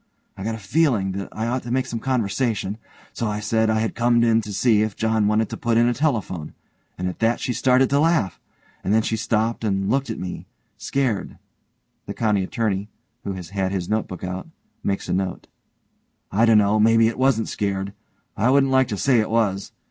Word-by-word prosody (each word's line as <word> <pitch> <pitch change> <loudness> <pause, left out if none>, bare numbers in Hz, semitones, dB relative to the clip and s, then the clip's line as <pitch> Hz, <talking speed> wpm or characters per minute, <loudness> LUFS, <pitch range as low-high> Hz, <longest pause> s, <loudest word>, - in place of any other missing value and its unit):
I 95 - -7
got 110 +2 -2
a - - -6
feeling 110 -2 +1
that 100 +1 -5
I 110 - -3
ought 125 +2 -1
to 120 - -8
make 130 +1 +1
some 115 - -4
conversation, 110 -3 -1 0.3
so 115 - -2
I 105 0 -2
said 110 +1 +1
I 110 0 +2
had 110 - -1
come 120 0 +3
in 115 -1 +4
to 105 -1 -7
see 105 +1 +3
if 110 -2 -1
John 110 -2 +1
wanted 105 +1 +2
to - - -4
put 115 -1 +1
in 120 +1 +4
a 120 - +2
telephone, 110 - -2 0.4
and 90 - -2
at 90 - -5
that 115 +1 +2
she 125 - -2
started 130 +1 +3
to 140 - +3
laugh, 160 - +1 0.4
and 100 - +1
then 110 - +3
she 115 - -1
stopped 115 0 -1
and 95 -2 0
looked 135 -1 0
at 110 - -3
me 90 -1 -6 0.3
scared, 130 -7 -2 0.7
(the - - -5
COUNTY 105 -3 +1
ATTORNEY, 100 0 -2 0.4
who 100 - -2
has 90 -3 -8
had 95 -1 -1
his 95 -3 -3
notebook 105 -4 -2
out, 90 0 -4 0.4
makes 100 - -2
a - - -1
note) 95 -1 -2 0.9
I 110 +4 +3
dunno, 105 -2 +4
maybe 115 +1 +5
it 115 +2 -3
wasn't 130 -4 +2
scared. 100 -1 -2 0.4
I 115 - +2
wouldn't 135 0 +4
like 130 -1 +4
to 105 - -3
say 130 +2 +3
it 110 - 0
was. 105 -4 0
110 Hz, 210 wpm, -23 LUFS, 100-120 Hz, 0.9 s, maybe